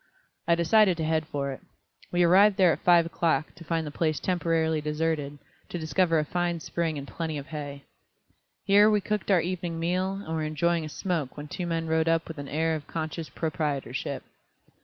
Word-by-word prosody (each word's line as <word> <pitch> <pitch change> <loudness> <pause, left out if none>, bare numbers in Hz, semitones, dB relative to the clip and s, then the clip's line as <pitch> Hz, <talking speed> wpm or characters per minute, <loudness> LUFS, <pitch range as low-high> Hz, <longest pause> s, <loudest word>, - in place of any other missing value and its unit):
I 170 - +5
decided 185 +2 +4
to 160 - -2
head 160 0 0
for 140 -2 -2
it. 135 - -8 0.5
We 175 0 +3
arrived 190 +3 +6
there 185 -3 +6
at - - -5
five 175 -2 +6
o'clock, 165 -2 0
to 175 - -13
find 165 0 -1
the 150 - -5
place 155 0 0
temporarily 165 -3 0
deserted, 150 -1 -2 0.3
to - - -4
discover 165 +1 +1
a 155 - +1
fine 175 +1 -1
spring 160 -1 -2
and 140 0 -6
plenty 160 -1 -4
of 140 - -6
hay. 145 -2 -6 0.8
Here 205 +2 +6
we 210 -1 +3
cooked 210 -1 -3
our 185 -4 +5
evening 175 -1 -3
meal 180 +3 0
and 195 -5 -6
were 160 - -1
enjoying 160 +2 0
a 155 - -5
smoke 160 -5 -3
when 145 0 -6
two 180 +2 -4
men 165 -1 -1
rode 160 0 +1
up 165 0 +1
with 165 -2 -7
an 140 - -6
air 160 +2 0
of 155 -2 -5
conscious 160 0 -4
proprietorship. 150 -3 -3
165 Hz, 200 wpm, -27 LUFS, 155-175 Hz, 0.8 s, arrived